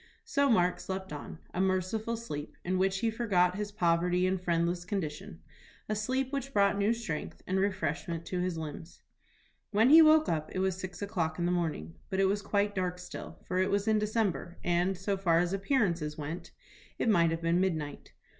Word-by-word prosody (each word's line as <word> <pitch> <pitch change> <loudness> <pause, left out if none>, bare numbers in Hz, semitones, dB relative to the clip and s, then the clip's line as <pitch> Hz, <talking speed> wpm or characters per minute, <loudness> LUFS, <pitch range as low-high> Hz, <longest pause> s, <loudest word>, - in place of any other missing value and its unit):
So 280 -11 +2
Mark 180 -6 +3
slept 190 -2 -5
on, 145 +2 -7 0.2
a 180 - 0
merciful 190 +5 0
sleep, 150 -10 -6
in 185 +1 0
which 190 0 +1
he 230 - +1
forgot 195 -6 +2
his 205 0 -3
poverty 180 -1 +2
and 185 0 0
friendless 175 0 0
condition; 185 0 -4 0.5
a 215 - -1
sleep 260 +5 -1
which 275 -1 -3
brought 200 0 +4
new 200 +2 +2
strength 220 -10 -4
and 190 +1 0
refreshment 170 -3 -2
to 180 - -3
his 180 -2 -1
limbs. 160 +2 -8 0.7
When 220 +6 +4
he 325 +1 +10
woke 310 0 +6
up 155 -1 -1
it - - 0
was 190 -1 +1
six 190 +1 -6
o'clock 170 -6 -2
in 175 - 0
the 175 - +1
morning. 160 - -2 0.2
But 190 - -1
it 195 - +4
was 200 +2 +1
quite 205 0 0
dark 180 -2 -1
still, 180 - -8
for 185 - -1
it 185 - +2
was 200 +1 0
in 215 -1 +4
December, 210 -5 -1
and, 175 +2 +1
so 195 +2 -1
far 175 -4 +3
as 175 +2 +1
appearances 190 - 0
went, 155 +4 -5 0.5
it - - -1
might 170 -6 +4
have 165 +1 -3
been 170 +2 +2
midnight. 155 -6 -3
185 Hz, 195 wpm, -30 LUFS, 170-205 Hz, 0.7 s, he